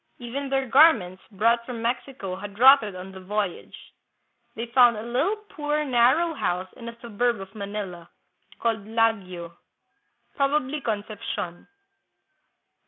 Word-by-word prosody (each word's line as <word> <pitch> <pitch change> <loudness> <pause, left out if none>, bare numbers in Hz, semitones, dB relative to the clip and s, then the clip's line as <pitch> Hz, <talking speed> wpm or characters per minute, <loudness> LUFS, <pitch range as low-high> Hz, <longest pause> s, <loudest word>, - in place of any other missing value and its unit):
Even 265 +3 -5
their 270 -1 0
garments 230 - +5
brought 230 +4 +2
from 240 -1 -6
Mexico 240 -5 -3
had 200 +1 -9
rotted 250 -5 +6
on 185 +1 -8
the 190 - -10
voyage. 200 0 -4 0.6
They 230 - -4
found 240 -1 +5
a 215 - -5
little, 250 - 0
poor, 300 -2 -1
narrow 265 +7 +3
house 185 - -2
in 235 -1 -8
a 235 0 -13
suburb 235 0 0
of 195 0 -10
Manila, 200 -4 -6 0.5
called 225 -3 -1
Laguio 195 -7 -1 0.8
(probably 280 0 0
Concepcion). 205 -5 -4
230 Hz, 125 wpm, -25 LUFS, 195-260 Hz, 0.8 s, rotted